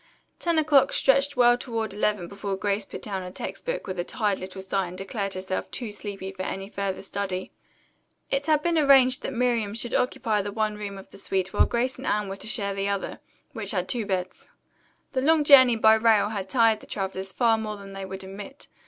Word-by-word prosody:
Ten 340 -2 +1
o'clock 295 -3 +4
stretched 275 +1 +3
well 240 -1 +6
toward 225 -5 -3
eleven 205 -3 0
before 200 +1 -4
Grace 200 +1 0
put - - -9
down 195 -3 -3
her 180 - -6
text 185 - -7
book - - -2
with 185 -2 -5
a - - +1
tired 205 0 -1
little 190 +1 -7
sigh 190 -1 -1
and 180 +1 -9
declared 195 0 -3
herself 185 0 -3
too 235 -4 -5
sleepy 200 -2 -6
for 190 -1 -6 0.3
further 195 -1 -3
study. 190 -2 -3 0.8
It 275 +2 0
had 305 -1 +3
been 340 -2 +2
arranged 270 -3 +5
that - - -4
Miriam 235 -4 0
should 235 +1 -3
occupy 225 -4 +1
the 205 +1 -4
one 215 0 -1
room 205 -1 -6
of 195 - -12
the - - -12
suite 190 -1 -1
while - - +4
Grace 250 +2 -1
and 265 - -6
Anne 210 -1 0
were 195 - -5
to - - -7
share 205 -4 -1
the 195 0 -1
other, 200 -1 -3 0.3
which 220 -5 -4
had 185 -3 0
two 230 -4 -2
beds. 185 -2 -3 0.6
The 260 - +1
long 310 +2 +4
journey 260 -4 +8
by 220 0 +6
rail 220 -2 +4
had 200 -3 -4
tired 225 -2 +4
the - - -15
travelers 190 -1 -4
far 225 0 +2
more 215 -1 -4
than 195 -1 -11
they 195 0 -6
would 190 0 -6
admit. 200 +8 -9
210 Hz, 215 wpm, -26 LUFS, 195-245 Hz, 0.8 s, journey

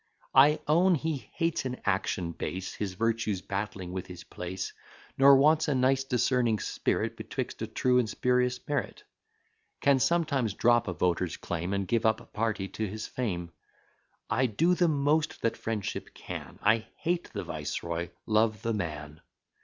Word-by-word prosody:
I 145 +3 +6
own 175 +4 +5
he 150 -6 -3
hates 165 -1 0
an 125 -1 -3
action 95 -3 0
base, 90 +2 -4
His 95 -3 -4
virtues 115 -2 0
battling 100 -2 -4
with 95 0 -5
his 90 -1 -9
place: 90 +1 -5 0.4
Nor 140 +1 +8
wants 155 +4 +4
a 145 - +1
nice 130 +1 +3
discerning 125 -3 +2
spirit - - -1
Betwixt - - -5
a - - -2
true 125 -1 +2
and 115 -3 0
spurious 125 +2 +1
merit; 145 -3 -2 0.8
Can 140 -1 +4
sometimes 140 - +1
drop 120 -1 +3
a 90 - -1
voter's 90 0 0
claim, 85 +2 -3
And 100 -1 -1
give 115 +1 +2
up 110 0 -1
party 110 -3 -1
to 110 - -3
his 105 +2 -5
fame. 90 -9 -3 0.8
I 130 +3 +2
do 165 - +2
the 180 -1 +3
most 150 +1 +1
that 115 - +1
friendship 110 -3 -4
can; - - -7
I 110 +1 +3
hate 175 +1 -1
the - - -4
viceroy, 85 0 -4 0.2
love 110 0 +2
the 115 - 0
man. 75 -6 -5
115 Hz, 160 wpm, -29 LUFS, 95-135 Hz, 0.8 s, Nor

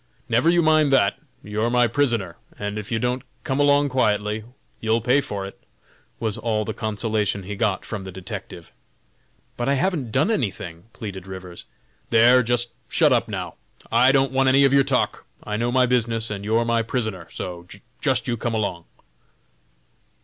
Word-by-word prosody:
"Never 120 +8 +3
you 170 0 +4
mind 155 -2 +4
that! 100 -7 +3 0.2
you're 105 +3 -1
my 125 0 +4
prisoner, 115 - 0 0.2
and 105 +1 -3
if 105 - -8
you 115 - +1
don't 125 +2 -1 0.2
come 135 +1 -1
along 145 0 +4
quietly, 105 -4 0 0.4
you'll 110 +1 +1
pay 125 +5 +3
for 100 -6 -5
it!" 95 - -11 0.6
was 110 -2 -2
all 110 -2 -1
the 110 - -3
consolation 105 -2 -1
he 100 +3 -5
got 100 -3 0
from 105 -3 -5
the 95 - -7
detective. 95 -2 -8 0.9
"But 120 +2 -1
I 140 - +3
haven't 145 - -1
done 145 - +2
anything," 95 - -3
pleaded 95 -4 -7
Rivers. 95 -2 -8 0.4
"There, 120 +3 +6
just 120 0 0 0.2
shut - - +4
up, - - +1
now! - - -5 0.3
I 125 +3 +5
don't 135 -1 +2
want 135 0 +3
any 135 +1 +5
of 135 - +3
your 140 0 +6
talk. - - -1 0.2
I 105 - -3
know 120 +3 0
my 130 0 +4
business, 115 -2 0
and 100 -1 -4
you're 110 +3 +1
my 115 0 +2
prisoner; 110 -7 -3
so 85 -1 -7 0.3
just - - +1
you 120 - -1
come 115 +1 -2
along." 95 -6 -2
115 Hz, 175 wpm, -23 LUFS, 105-130 Hz, 0.9 s, There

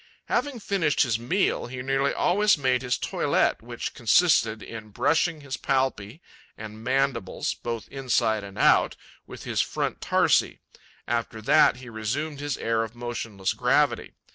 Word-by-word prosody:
'Having 285 -4 -1
finished 190 -8 0
his 115 -4 0
meal, 170 +9 0
he 125 +1 -7
nearly 135 +1 +1
always 205 +1 +3
made 130 -3 +1
his 125 -1 -1
toilet, - - 0
which 120 +1 -6
consisted 115 -4 +3
in 110 -1 -9
brushing 160 - +1
his 140 -1 -5
palpi 130 - -1 0.4
and 110 0 -9
mandibles, 135 -5 -1
both 115 -2 -5
inside 120 -5 0
and 100 -1 -10
out, - - +4 0.3
with - - -10
his - - 0
front - - -3
tarsi. - - +2 0.5
After 115 -1 -2
that, - - +5
he 125 0 -12
resumed 130 +7 -3
his 145 -1 -3
air 115 0 0
of 115 +1 -5
motionless 115 -5 -3
gravity. - - +1
125 Hz, 145 wpm, -25 LUFS, 110-140 Hz, 0.5 s, that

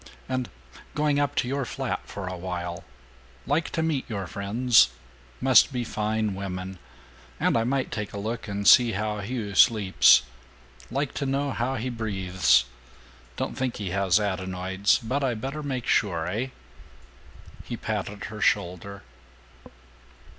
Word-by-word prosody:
and 130 -2 -2 0.5
going 150 -1 +2
up 145 -2 0
to - - +1
your 140 +2 -1
flat - - -3
for 100 -2 -6
a 90 - -4
while? 90 -1 -5 0.6
Like 145 +5 0
to 160 - -1
meet 155 -6 -1
your 100 -4 -3
friends 105 - +3 0.5
must 130 +2 +5
be 125 -2 -2
fine 110 -1 -1
women 95 -1 -5 0.6
and - - +2
I 115 - +3
might 135 +1 -1
take 105 -1 -4
a - - -7
look 110 +3 -4
and 100 0 -2
see 120 -3 +7
how 105 +1 -2
Hugh 105 -1 -4
sleeps. 95 - +6 0.7
Like 135 +3 -2
to 140 - -2
know 140 +1 0
how 130 +2 -1
he 125 +1 -3
breathes. 95 - +2 0.7
Don't - - -3
think 130 -2 -2
he 100 -4 -4
has 100 0 +3
adenoids, 95 -1 0
but 130 +5 -2
I 125 -3 +1
better 135 +7 -5
make 130 -4 -3
sure, 85 -7 +1
eh?" 110 +9 -2 1.2
He - - -6
patted 100 -1 -4
her 110 -1 -7
shoulder. 100 +1 0
110 Hz, 145 wpm, -26 LUFS, 95-130 Hz, 1.2 s, see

